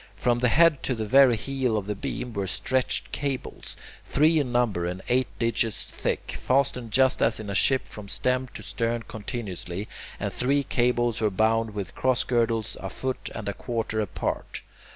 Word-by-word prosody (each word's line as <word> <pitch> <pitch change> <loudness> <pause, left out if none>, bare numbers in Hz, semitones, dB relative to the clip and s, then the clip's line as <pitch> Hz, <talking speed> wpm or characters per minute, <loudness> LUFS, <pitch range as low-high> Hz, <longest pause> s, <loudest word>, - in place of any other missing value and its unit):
From 120 +5 +1
the 125 - +3
head 155 +3 +5
to 130 - -1
the 110 -1 -3
very 130 +2 +6
heel 130 -2 -1
of 100 - -2
the 105 - -2
beam 120 +4 -4
were 100 -2 -2
stretched 130 +7 0
cables, 140 -3 -4 0.3
three 155 +3 +3
in 130 -4 -1
number 110 -8 +1
and 90 +1 -5
eight 125 +1 +3
digits 115 -1 0
thick, - - -3
fastened 130 -3 +1
just 130 +3 +3
as 115 -1 +2
in 105 -2 -5
a - - -2
ship 130 +6 +2
from 105 -2 -10
stem 125 +5 0
to - - -7
stern 115 0 -1
continuously, 100 -4 -5 0.3
and - - -2
these 140 +3 +1
cables 120 -2 +1
were 110 - +3
bound 110 +2 +1
with 100 -3 -4
cross 130 -2 +2
girdles 115 -2 0
a - - -5
foot 130 -1 -4
and 110 - -5
a 100 - -1
quarter 110 0 -2
apart. 100 -4 -3
120 Hz, 180 wpm, -26 LUFS, 105-130 Hz, 0.3 s, very